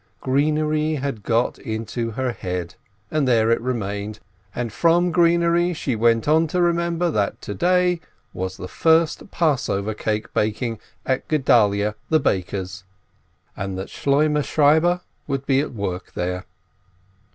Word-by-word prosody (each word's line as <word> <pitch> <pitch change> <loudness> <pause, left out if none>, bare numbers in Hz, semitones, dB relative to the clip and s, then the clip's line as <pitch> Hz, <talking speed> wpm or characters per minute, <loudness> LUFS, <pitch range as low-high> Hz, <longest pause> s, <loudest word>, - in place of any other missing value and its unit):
Greenery 155 +3 +1
had 135 -6 -3
got 115 +3 0
into 115 0 -3
her 125 +3 -2
head, 90 -5 -4 0.4
and 150 -3 +1
there 115 -2 +3
it 115 - +2
remained, 105 -4 -3 0.4
and 120 -3 -3
from 170 +8 +3
greenery 170 0 +3
she 135 -5 -2
went 115 +1 +2
on 160 +2 +4
to 180 +4 -1
remember 170 0 +1
that 100 -7 -1
to 105 - -5
day 180 - +2 0.3
was 95 +1 -4
the 90 - -6
first 160 - +2
Passover 130 - 0
cake 105 0 -3
baking 110 +1 -1 0.3
at 130 0 -1
Gedalyeh 105 -8 +3 0.2
the 155 - +4
baker's, 95 - -2 0.7
and 95 -1 -4
that 95 - -5
Shloimeh 150 +2 +1
Shieber 160 +5 +3 0.3
would 135 -1 -2
be 135 -1 +3
at 145 - -2
work 95 -5 -5
there. 90 +1 -3
130 Hz, 140 wpm, -22 LUFS, 105-155 Hz, 0.7 s, on